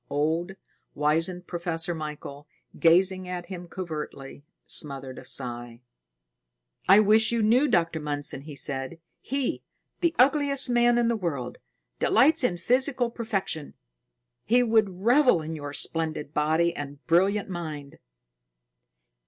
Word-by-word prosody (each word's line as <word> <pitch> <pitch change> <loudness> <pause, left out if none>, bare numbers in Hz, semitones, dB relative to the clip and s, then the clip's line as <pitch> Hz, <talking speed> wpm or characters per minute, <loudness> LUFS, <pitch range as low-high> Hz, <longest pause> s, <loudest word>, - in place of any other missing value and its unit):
Old, 160 +6 -1 0.4
wizened 165 +5 0
Professor 170 -1 -3
Michael, 150 -2 -8 0.3
gazing 185 +2 +3
at 180 -1 -5
him 180 -2 -8
covertly, 150 -6 -7 0.2
smothered 135 -3 -1
a - - -12
sigh. 120 -2 -2 1.1
"I 195 +2 +8
wish 215 +2 +4
you 230 -2 0
knew 245 +7 +4
Dr. 165 - +1
Mundson," 145 -2 -1
he 150 -2 -9
said. 135 +3 -4 0.2
"He, 275 -1 -2 0.4
the 340 -1 0
ugliest 275 0 +3
man 240 0 +3
in 240 -1 +2
the 235 - +1
world, 150 - -4 0.4
delights 305 +2 +4
in 180 -8 +1
physical 250 +5 +1
perfection. 195 -10 -3 0.7
He 245 +3 +3
would 220 -3 +3
revel 250 - +4
in 160 +1 -5
your 145 -2 -6
splendid 155 -1 -1
body 160 +3 +1
and 145 0 -8
brilliant 195 +5 +2
mind." 155 -6 -7
170 Hz, 125 wpm, -26 LUFS, 150-225 Hz, 1.1 s, I